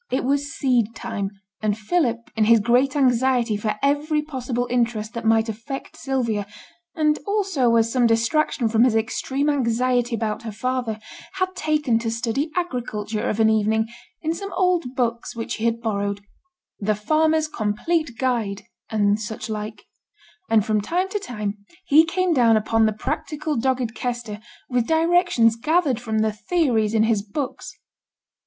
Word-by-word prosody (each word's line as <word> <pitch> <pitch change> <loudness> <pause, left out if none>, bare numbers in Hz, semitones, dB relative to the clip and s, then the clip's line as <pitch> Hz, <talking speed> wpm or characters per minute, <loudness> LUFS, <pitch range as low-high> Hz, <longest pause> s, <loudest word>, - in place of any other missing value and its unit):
It 260 - 0
was 280 +2 0
seed 240 -4 +1
time, 200 -1 -3 0.3
and 210 -1 0
Philip, 235 -1 -1
in 220 -1 +3
his 230 +1 +6
great 250 +6 +2
anxiety 250 -4 +2
for 210 +1 -1
every 300 +2 +1
possible 250 -4 -3
interest 235 -3 -1
that 235 -2 -3
might 225 0 +4
affect 230 +5 -6
Sylvia, 235 -7 -1 0.5
and 305 -1 +2
also 375 - +2
as 225 0 +3
some 250 -2 +4
distraction 235 +3 +1
from 225 +1 +3
his 250 -3 +3
extreme 260 +5 -1
anxiety 250 -3 +1
about 220 -1 -2
her 230 -2 -6
father, 235 0 -2 0.3
had 370 -1 -2
taken 300 -8 +1
to 230 0 -2
study 235 +6 -1
agriculture 230 - -2
of 215 - -2
an 220 - +5
evening 220 +1 +1 0.3
in 320 +1 0
some 395 +3 -6
old 360 -4 +2
books 235 -2 -1
which 225 -1 -4
he 225 - -3
had 230 0 0
borrowed 200 -2 -2 0.6
The 215 +1 +1
Farmer's 310 +8 +2
Complete 250 +4 -1
Guide, 230 -6 -1 0.3
and 205 -1 +2
such 220 +1 -5
like; 215 0 -5 0.7
and 220 -2 +4
from 215 -1 +1
time 360 - -1
to 415 - -2
time 210 - -5 0.2
he 315 0 +6
came 370 +1 +1
down 235 -5 +5
upon 220 +1 +2
the - - +1
practical 300 +7 -3
dogged 250 -1 0
Kester 235 -2 -4 0.3
with 245 -2 0
directions 325 -8 +3
gathered 290 0 +1
from 220 -2 -1
the 215 -1 +1
theories 225 -5 +1
in 220 - +4
his 220 -2 +2
books. 245 +7 -5
235 Hz, 160 wpm, -23 LUFS, 220-285 Hz, 0.7 s, his